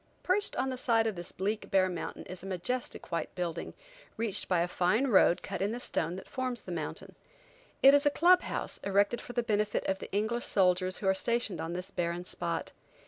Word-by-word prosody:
Perched 400 +3 +2
on 265 +1 0
the 255 - -5
side 230 -3 +2
of 220 - 0
this 175 -1 -6
bleak, 205 +3 -3
bare 190 -2 +4
mountain 175 -2 -5
is 185 0 -7
a 190 - -8
majestic 195 +5 -3
white 165 -2 -3
building, 170 -2 -4 0.4
reached 225 -3 0
by 180 -2 +2
a 175 - +1
fine 185 +8 +1
road 190 -7 +4
cut 195 -2 -4
in 205 +3 0
the 240 - -4
stone 170 -7 -1
that 190 - -9
forms 255 -3 -3
the 185 - -9
mountain. 160 -3 -5 0.7
It 275 +1 +9
is 285 +1 +4
a - - +7
club 360 +5 +5
house, - - -3
erected 200 +4 +2
for 245 - -9
the 240 - 0
benefit 210 -2 0
of 190 0 -1
the - - -8
English 220 +4 0
soldiers 185 -1 +2
who 195 - -3
are 190 - +5
stationed 235 +1 -1
on 165 +1 -4
this 180 +2 -4
barren 175 0 -2
spot. 170 -2 -3
195 Hz, 215 wpm, -30 LUFS, 180-240 Hz, 0.7 s, It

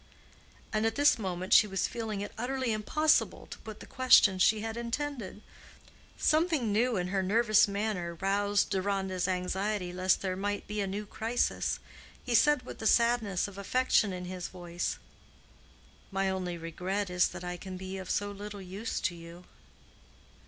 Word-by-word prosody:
And 215 0 +1
at 225 - -2
this 290 -3 +4
moment 185 -2 -2
she 210 - +7
was 195 -2 -1
feeling 220 -4 -4
it 205 - -5
utterly 255 +1 -2
impossible 305 +9 +1
to - - -10
put 220 -2 -10
the - - -9
questions 210 -7 +5
she 215 +3 +4
had 225 0 -4
intended. 235 -3 -4 0.7
Something 310 -8 +2
new 230 +2 +2
in 180 0 -2
her 195 0 0
nervous 215 +3 +4
manner 200 -4 -2
roused 200 +3 +1
Deronda's 190 -1 -1
anxiety 185 +1 -2
lest 185 +1 +2
there 185 -1 -1
might 205 +2 -2
be 210 0 -3
a 195 - -1
new 205 +2 -4
crisis. 225 +4 -1 0.4
He 245 - -2
said 290 +4 +4
with - - -9
the 220 - 0
sadness 235 -6 +2
of 200 -1 -10
affection 220 -1 +2
in 180 -1 -5
his 180 -1 -5
voice, 175 -1 -4 1.1
"My 195 -1 0
only 180 -2 -3
regret 180 +4 -3
is, 180 0 +3
that - - -8
I 180 0 -4
can 185 +1 -8
be 190 +1 -6
of 190 - -8
so 205 0 -1
little 205 0 -8
use 195 +4 -4
to 175 - 0
you." 170 +1 -11
200 Hz, 165 wpm, -30 LUFS, 185-225 Hz, 1.1 s, she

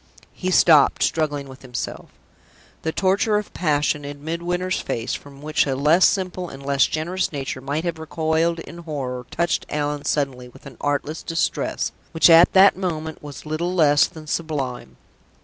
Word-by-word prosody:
He 185 - -3
stopped, 165 -4 +5
struggling 145 -3 -1
with 130 0 -12
himself. 125 -2 -6 0.7
The 160 - -2
torture 200 +4 +2
of 210 - -5
passion 150 -3 0
in 145 0 -8
Midwinter's 175 +3 -2
face, 115 - -3
from 140 0 -9
which 155 -1 +1
a 135 - 0
less 150 +7 +5
simple 185 -2 -2
and 135 0 -11
less 140 -1 +3
generous 175 +4 -2
nature 135 -3 -4
might 145 +4 -2
have 170 -2 -3
recoiled 160 +1 0
in 170 - -10
horror, 130 -7 -5
touched 170 -1 -1
Allan 145 -1 -2
suddenly 130 -4 -1
with - - -18
an 135 -3 -11
artless 145 +2 -2
distress, 165 -2 -1 0.2
which, 165 +1 +5
at 165 +2 +7
that 195 +1 +7
moment, 160 -4 -4
was 145 0 -10
little 170 +4 -2
less 145 -4 +5
than 155 -1 -12
sublime. 135 - -4
155 Hz, 165 wpm, -22 LUFS, 140-170 Hz, 0.7 s, at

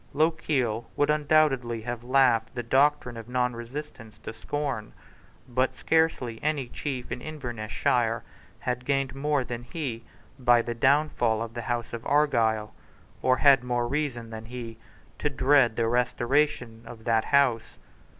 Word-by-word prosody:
Lochiel 140 -7 0
would 145 +1 +2
undoubtedly 145 -6 +2
have 120 +1 -5
laughed 125 -3 +3
the 120 - -3
doctrine 135 0 +2
of 115 +1 -9
nonresistance 125 -1 -4
to - - -8
scorn. 130 -1 -4 0.5
But 130 +1 0
scarcely 160 -8 +1
any 145 -5 -1
chief 130 -3 -5
in 125 - -4
Invernessshire 120 -4 -1 0.4
had 125 0 -2
gained 135 -1 0
more 145 0 0
than 120 -1 -5
he 120 -3 -5 0.4
by 120 -2 +4
the 120 - -3
downfall 120 -3 +2
of 115 -1 -8
the 120 - -4
House 120 -1 -2
of 115 -1 -5
Argyle, 115 -7 +2 0.5
or 130 0 +3
had 135 -3 +5
more 120 -1 -1
reason 130 -5 -3
than 110 0 -7
he 115 -1 -8 0.4
to 150 - 0
dread 135 -4 +3
the 115 0 +1
restoration 125 0 0
of 115 -2 -11
that 115 -1 +2
House. 135 -5 +2
125 Hz, 140 wpm, -27 LUFS, 115-140 Hz, 0.5 s, had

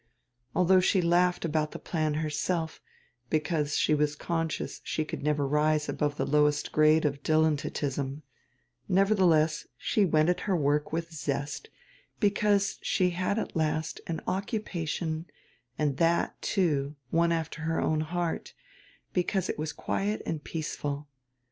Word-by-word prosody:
Although 185 +1 +5
she 185 +1 +3
laughed 175 +1 +2
about 155 -1 0
the - - -5
plan 155 -3 -1
herself, 160 +2 -2 0.5
because 150 -1 0
she - - +3
was 150 0 +1
conscious 165 0 -3
she 155 - -2
could - - -5
never 150 -1 +1
rise 150 +1 +2
above 145 0 -1
the - - 0
lowest 150 0 +2
grade 155 +1 +4
of 140 -1 -1
dilettantism, 145 -2 0 0.7
nevertheless 180 -6 +3
she 210 - +1
went 155 -3 +3
at 180 - +1
her 190 - +3
work 145 0 +1
with 165 +1 -3
zest, 145 - -3 0.5
because 205 -1 +2
she 180 -1 +1
at 185 +5 -1
last 155 0 -1
had 165 - -1
an - - -6
occupation 175 -5 -2 0.5
and 145 -3 0
that, 170 0 +1
too, 150 -7 0 0.2
one 170 0 +3
alter 160 -1 -2
her 160 0 0
own 155 -1 +1
heart, 170 +1 -3 0.6
because 185 +1 0
it - - -3
was 155 0 -2
quiet 210 +2 -2
and 155 -3 -3
peaceful. 150 -2 -4
160 Hz, 140 wpm, -29 LUFS, 150-175 Hz, 0.7 s, Although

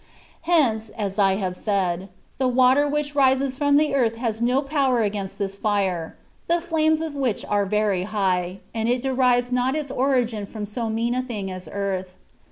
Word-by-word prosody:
Hence, 230 -10 +2
as 200 -1 -3
I 195 -1 +4
have 185 -2 -2
said, 190 -2 -1 0.3
the 260 - +2
water 255 +3 +4
which 295 0 -1
rises 265 -1 +2
from 285 +1 +3
the 300 -1 +2
earth 235 -5 +2
has 225 -1 -3
no 250 +4 +2
power 275 -4 +1
against 200 -2 -3
this 195 -1 -3
fire, 195 -6 -1 0.3
the 340 +1 +2
flames 315 -2 +1
of 320 -2 -4
which 265 -7 -1
are 205 -1 0
very 210 -2 +1
high, 190 -3 -1
and 225 0 -1
it 245 0 0
derives 250 -2 +2
not 250 +2 +1
its 300 -3 -3
origin 245 -6 0
&om 210 -1 -3
so 225 +2 -3
mean 230 +2 0
a 255 - 0
thing 210 -7 -5
as 185 -3 -7
earth. 190 -2 -3
230 Hz, 180 wpm, -23 LUFS, 200-265 Hz, 0.3 s, I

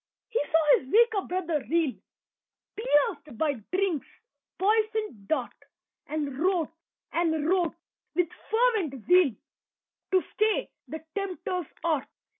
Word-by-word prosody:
He 470 - 0
saw 315 -2 +5
his 260 - -12
weaker 445 -2 +5
brother 340 -5 -1
reel, 325 -4 +2 0.8
Pierced 295 - +1
by 300 +1 +2 0.2
Drink's 365 -5 0 0.5
poisoned 430 - 0
dart, 265 -6 0 0.5
And 290 -3 -3
wrought 345 -2 +1 0.4
and 320 -2 +1
wrote 355 -2 +2 0.4
with 355 -2 +2 0.2
fervent 430 - +1
zeal 355 -9 +5 0.8
To 370 - +5
stay 430 -2 +1 0.2
the 315 0 -7
Tempter's 365 -4 -3 0.2
art. 320 -5 +1
340 Hz, 110 wpm, -28 LUFS, 300-395 Hz, 0.8 s, saw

